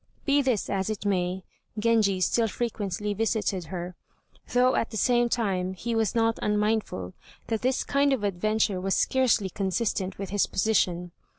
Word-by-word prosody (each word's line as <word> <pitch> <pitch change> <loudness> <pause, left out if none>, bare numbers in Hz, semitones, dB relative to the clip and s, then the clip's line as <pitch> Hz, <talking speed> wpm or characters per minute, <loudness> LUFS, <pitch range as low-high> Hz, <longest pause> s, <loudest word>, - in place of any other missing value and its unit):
Be 285 0 +4
this 255 -6 0
as 195 0 -1
it 210 -1 -4
may, 185 -1 0 0.3
Genji 210 -4 +2
still 230 +4 +2
frequently 210 -2 -3
visited 210 -4 -1
her, 180 +1 -5 0.6
though 250 +1 +4
at 230 - 0
the 220 - -5
same 240 +1 +3
time 190 -6 -1
he 235 +5 -3
was 225 -3 0
not 225 0 +2
unmindful 210 - -1 0.4
that 225 -2 -1
this 255 +1 +1
kind 280 0 +2
of 260 -6 0
adventure 205 0 0
was 195 +1 0
scarcely 240 -7 +2
consistent 195 0 -1
with 195 -1 -6
his 205 -1 +2
position. 180 -4 0
210 Hz, 160 wpm, -27 LUFS, 190-230 Hz, 0.6 s, Be